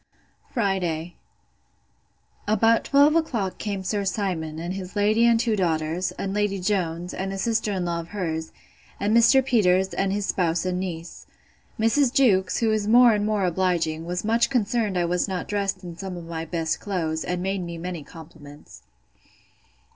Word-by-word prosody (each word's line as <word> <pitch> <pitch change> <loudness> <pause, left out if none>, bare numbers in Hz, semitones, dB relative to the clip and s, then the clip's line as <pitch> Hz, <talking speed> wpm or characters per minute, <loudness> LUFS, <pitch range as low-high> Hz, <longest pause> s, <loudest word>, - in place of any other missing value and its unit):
Friday. 180 - -1 1.3
About 225 +2 +3
twelve 285 +2 +4
o'clock 235 - -1
came 200 -2 -3
Sir 200 +2 -1
Simon, 180 -6 -2
and 170 +3 -4
his 190 0 -7
lady 215 +3 +3
and 230 -1 +4
two 225 -2 +1
daughters; 165 -1 0
and 195 0 -4
Lady 205 -1 0
Jones, 180 -3 -1
and 195 +1 -3
a 195 - -4
sister 220 +1 0
in 185 -3 -2
law 170 -1 -1
of 165 - -7
hers; 160 -5 -4 0.5
and 210 +2 +1
Mr. 255 +3 +5
Peters, 190 -6 +3
and 195 0 0
his 205 0 -1
spouse 175 -2 0
and 180 0 -1
niece. 170 -3 -6 0.5
Mrs. 240 +4 +3
Jewkes, 230 -10 +2
who 225 -1 +2
is 215 -1 0
more 240 +1 +7
and 210 0 0
more 210 -3 +1
obliging, 170 -3 0
was 180 +3 -3
much 230 +2 +2
concerned 225 -5 0
I 175 - +1
was 180 +2 0
not 185 -2 -4
dressed 195 -2 -2
in 175 -2 -8
some 185 0 -6
of 170 - -8
my 165 -1 -5
best 165 -1 -2
clothes, 165 -5 -2
and 180 0 -3
made 195 0 -1
me 170 -1 -6
many 175 -1 -5
compliments. 150 -2 -13
190 Hz, 170 wpm, -24 LUFS, 170-215 Hz, 1.3 s, more